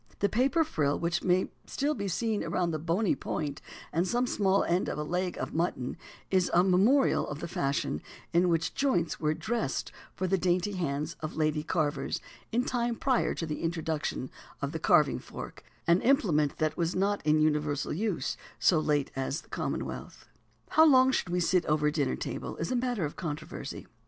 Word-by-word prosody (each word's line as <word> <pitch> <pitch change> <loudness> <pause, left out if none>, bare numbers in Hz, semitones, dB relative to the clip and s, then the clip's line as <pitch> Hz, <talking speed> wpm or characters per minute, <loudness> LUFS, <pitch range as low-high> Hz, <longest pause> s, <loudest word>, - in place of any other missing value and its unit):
The 200 - +1
paper 270 +9 +3
frill 150 - 0
which 170 0 -1
may 185 0 +2 0.2
still 290 +2 0
be 200 -7 -3
seen 215 +3 -1
round 175 -2 0
the 155 - -2
bony 170 +6 +1
point 145 -2 -4 0.3
and 170 +4 +1
small 210 -5 +2
end 175 +2 +1
of - - -3
a 150 - -1
leg 180 +3 -2
of - - -4
mutton, 160 -6 -1 0.4
is 185 -2 +3
a 175 - +6
memorial 200 +10 +4
of 145 - -5
the 170 - -4
fashion 140 -3 -1 0.3
in 175 +1 +4
which 165 -1 +1
joints 255 - +1
were 155 0 +1
dressed 220 - -2 0.2
for 185 - -2
the 190 +1 +1
dainty 180 +2 +1
hands 155 -4 -2
of 155 - -5
lady 155 -1 +1
carvers, 150 -3 -1 0.3
in 245 +3 +1
time 240 -1 0
prior 255 +1 +1
to 165 - -3
the 150 -2 -4
introduction 160 -5 -2 0.3
of - - -2
the - - -4
carving - - +4
fork, 60 -1 -9 0.2
an 170 +2 +4
implement 175 - +2
that 155 0 0
was 170 0 -1
not 200 +2 +1
in 155 0 +3
universal 150 -1 +1
use 200 +1 -1 0.2
so 170 - +4
late 145 -2 +1
as 135 +3 -2
the - - -24
Commonwealth." - - -4 0.4
How 315 - +6
long 260 -2 +6 0.2
we 180 +1 0
should - - +2
sit 180 +1 +2
over 150 0 +3
the - - -2
dinner 145 - 0
table - - -5
is 165 - -3
a - - +1
matter 245 -7 0
of 145 - -5
controversy. 155 -4 -6
170 Hz, 185 wpm, -29 LUFS, 155-205 Hz, 0.4 s, a